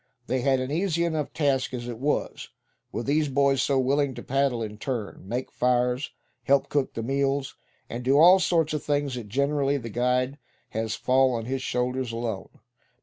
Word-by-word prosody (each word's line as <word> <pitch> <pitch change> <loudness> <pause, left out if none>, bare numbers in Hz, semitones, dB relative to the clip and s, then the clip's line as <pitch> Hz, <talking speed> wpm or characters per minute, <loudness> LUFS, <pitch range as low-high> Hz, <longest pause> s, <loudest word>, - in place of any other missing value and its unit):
They 130 0 -1
had 130 +1 +2
an 130 +1 -3
easy 170 +1 0
enough 155 -3 -2
task 135 -4 0
as 120 -1 -5
it 120 -2 -6
was, 145 +3 -2 0.4
with 115 - -4
these 150 +2 +2
boys 135 0 +2
so 140 - +1
willing 135 +1 +1
to - - -8
paddle 135 -3 0
in 105 -1 -7
turn, 120 -6 -4
make 125 +5 -3
fires, 125 +2 +1 0.4
help 140 0 +3
cook 145 -2 -1
the 115 - -3
meals, 135 +2 0 0.3
and 120 +2 -6
do 135 +3 +3
all 180 +5 +8
sorts 165 -4 +1
of 150 - -2
things 145 -2 0
that 120 -4 -6
generally 140 +3 +1
the 115 -4 -6
guide 125 +4 0 0.3
has 110 0 -2
fall 130 +1 +3
on 115 -1 -3
his 130 +2 -2
shoulders 125 0 -1
alone. 115 -4 -4
130 Hz, 185 wpm, -26 LUFS, 125-140 Hz, 0.4 s, all